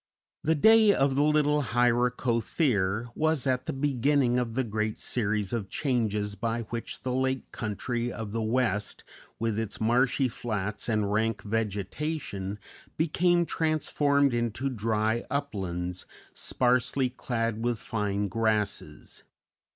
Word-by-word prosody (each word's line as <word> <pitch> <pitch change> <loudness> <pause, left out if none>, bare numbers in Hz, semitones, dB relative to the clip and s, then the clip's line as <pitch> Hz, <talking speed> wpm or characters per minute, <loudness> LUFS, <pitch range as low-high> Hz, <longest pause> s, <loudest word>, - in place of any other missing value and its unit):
The 160 +1 +3
day 220 +6 +6
of 135 0 +2
the 140 - +2
little 150 0 +3
Hyracothere 120 - +1
was 155 -2 +1
at 130 -1 0
the - - 0
beginning 135 -2 +2
of 115 -2 -3
the 130 - +1
great 110 -1 -2
series 105 -3 0
of 105 -5 -2
changes 110 -7 0
by 115 +3 -2
which 115 -1 -5
the 125 - -1
lake 130 0 -1
country 120 +3 -3
of 110 -3 -6
the 115 +1 -2
West, 110 -3 -1 0.3
with 110 -1 -1
its 110 -2 -4
marshy 125 +4 +2
flats 105 -3 -4
and 105 -2 +1
rank 110 0 0
vegetation, 105 - -3 0.4
became 175 +2 +2
transformed 145 -4 +1
into 120 +3 -1
dry 110 0 0
uplands 95 -10 -3 0.3
sparsely 125 +1 +1
clad 115 -3 -2
with 120 -1 0
fine 105 -3 -2
grasses. 110 0 -2
120 Hz, 125 wpm, -28 LUFS, 105-135 Hz, 0.4 s, day